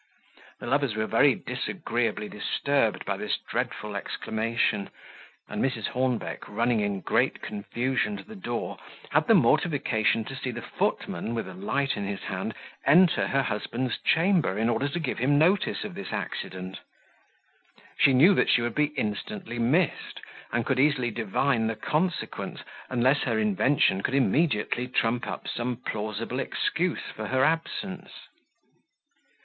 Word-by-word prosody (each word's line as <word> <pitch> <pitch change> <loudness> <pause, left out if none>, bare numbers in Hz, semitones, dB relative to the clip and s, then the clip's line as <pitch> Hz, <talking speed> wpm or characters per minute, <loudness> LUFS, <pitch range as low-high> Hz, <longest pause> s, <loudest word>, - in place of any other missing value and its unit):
The - - -7
lovers 135 -2 +1
were 110 0 0
very 130 +5 +4
disagreeably 120 - -2
disturbed 115 +3 0
by - - -1
this - - -1
dreadful 105 -1 -4
exclamation; 110 0 -1 0.6
and - - -2
Mrs. 125 -5 -1
Hornbeck, 125 -2 -2
running 115 +2 +1
in 100 -2 -1
great - - +1
confusion 130 - -1
to - - -9
the 220 - -12
door, 120 - -4 0.3
had - - +3
the - - +7
mortification 115 -9 +2
to 135 - -7
see 130 -1 -4
the 120 -1 -5
footman, 115 - -2
with 115 - -3
a 95 - -8
light 135 +9 -1
in 100 -1 -3
his 100 -1 -4
hand, - - -4 0.3
enter 180 +1 +5
her 135 0 +1
husband's 120 +2 -2
chamber, 165 - +2
in 115 +2 +1
order 140 +4 +1
to 170 +4 -3
give 140 -8 -2
him 140 +4 +3
notice 180 +6 +2
of 210 - -6
this 200 +2 -7
accident. 95 0 -5 1.2
She 140 - +5
knew 150 +10 +7
that - - +2
she 120 - +4
would 120 -1 -1
be 150 0 +1
instantly 120 - -3
missed, 140 +8 +1 0.3
and 120 -1 0
could 135 -2 +1
easily 135 -4 +3
divine 115 +2 +1
the 115 - -1
consequence, 170 +9 -2 0.3
unless 130 +3 +3
her 115 -4 0
invention 105 0 +2
could 130 - -1
immediately 125 - +2
trump 120 -1 0
up - - -5
some 125 +1 -2
plausible 110 +1 -4
excuse 175 +6 -1
for 110 -1 -4
her 130 +4 +2
absence. 185 +4 -1
125 Hz, 150 wpm, -27 LUFS, 110-145 Hz, 1.2 s, the